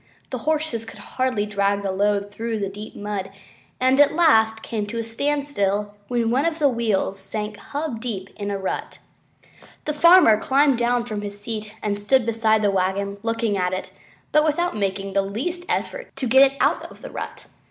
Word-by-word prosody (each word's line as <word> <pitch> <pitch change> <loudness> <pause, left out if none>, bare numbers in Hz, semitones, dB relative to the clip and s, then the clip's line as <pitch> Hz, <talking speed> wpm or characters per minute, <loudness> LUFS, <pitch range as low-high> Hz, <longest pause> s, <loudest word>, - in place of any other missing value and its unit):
The - - -3
horses 310 -7 -1
could 225 - -11
hardly 255 -5 -1
drag 200 -1 0
the 195 - -1
load 205 +1 0
through 225 +1 -3
the 200 -2 -2
deep 210 +2 -9
mud, 205 -2 -4 0.5
and 260 +2 +3
at 290 +1 +5
last 220 -10 +4
came 215 -3 -3
to 230 +3 -5
a 230 - -1
standstill 225 -5 -1
when 235 -2 0
one 260 +4 +2
of 330 -1 0
the 300 -3 +3
wheels 220 -5 0
sank 210 +2 -4
to - - -14
the - - -16
hub 285 -6 -4 0.3
in 205 -1 -4
a 200 - -1
rut. 190 -1 -4 0.9
The 300 - -1
farmer 335 - +7
climbed 275 -2 +3
down 240 0 +1
from 215 -3 -4
his 205 0 -5
seat 215 0 -5
and 205 -1 -1
stood 240 +4 +3
beside 220 -1 +2
the 205 - +3
wagon 195 +1 -1
looking 225 -2 0
at 180 0 0
it 185 - -4 0.4
but 305 - +5
without 330 +3 0
making 195 -1 -2
the 195 - +3
least 275 - -4
effort - - -2
to 270 -1 -3
get 265 +3 +6
it 275 - -15
out - - +1
of - - -16
the - - -7
rut. - - -7
220 Hz, 195 wpm, -23 LUFS, 205-265 Hz, 0.9 s, farmer